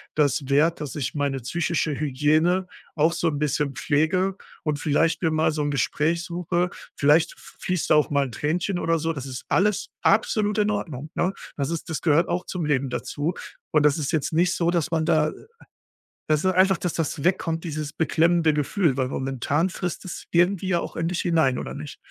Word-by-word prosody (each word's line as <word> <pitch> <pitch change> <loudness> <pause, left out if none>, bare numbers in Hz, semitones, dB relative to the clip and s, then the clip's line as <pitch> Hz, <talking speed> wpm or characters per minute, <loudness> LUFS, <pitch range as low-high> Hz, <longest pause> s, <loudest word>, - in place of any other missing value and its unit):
das 145 -2 +1
wert, 155 +4 +3
dass 145 -4 -5
ich 140 -3 -3
meine 140 -2 -1
psychische 165 +4 -1
Hygiene 155 +6 +2 0.3
auch 160 +2 +3
so 170 - 0
'n 150 -3 0
bisschen 145 -1 0
pflege 185 +8 +1 0.3
und 150 -2 -1
vielleicht 160 +2 +1
mir 165 - +2
mal 155 0 +2
so 150 -1 -2
'n 145 - 0
Gespräch 150 +5 0
suche.“ 175 +1 -1 0.2
Vielleicht 150 +3 +3
f - - -17
fließt 180 -3 -1
da - - +7
auch 150 - +3
mal 140 -1 +2
'n 130 - -7
Tränchen 175 - -1
oder 165 -1 +1
so, 165 +1 -1
das 140 -3 -6
ist 130 -1 -7
alles 205 +1 +1
absolut 210 0 +2
in 210 0 +2
Ordnung, 155 -7 -4
ne? 185 +2 0 0.2
Das 140 -2 -1
ist 170 +1 -4
das 160 - -3
gehört 165 +1 +3
auch 175 +1 -2
zum 175 -4 -3
Leben 140 -3 +1
dazu 145 +7 -3 0.4
und 150 -1 +3
das 150 +2 +3
ist 145 - -2
jetzt 150 0 0
nicht 175 +3 +2
so, 170 0 +1
dass 170 -2 0
man 160 -1 0
da, 155 -2 +3
äh - - -8 0.9
weißt 155 +2 +1
du, 185 - +4
einfach, 190 0 +4
dass 180 - -2
das 155 -3 -2
wegkommt, 165 -2 0
dieses 155 -2 -4
beklemmende 165 +1 +2
Gefühl, 150 0 +1
weil 130 -1 0
momentan 135 +6 -1
frisst 180 -1 -4
es 180 - -7
irgendwie 180 +2 +2
ja 175 -2 +2
auch - - -6
in 165 - -1
dich 175 0 -1
hinein 160 -7 +2
oder - - -6
nicht? 145 0 -8
160 Hz, 205 wpm, -24 LUFS, 145-175 Hz, 0.9 s, da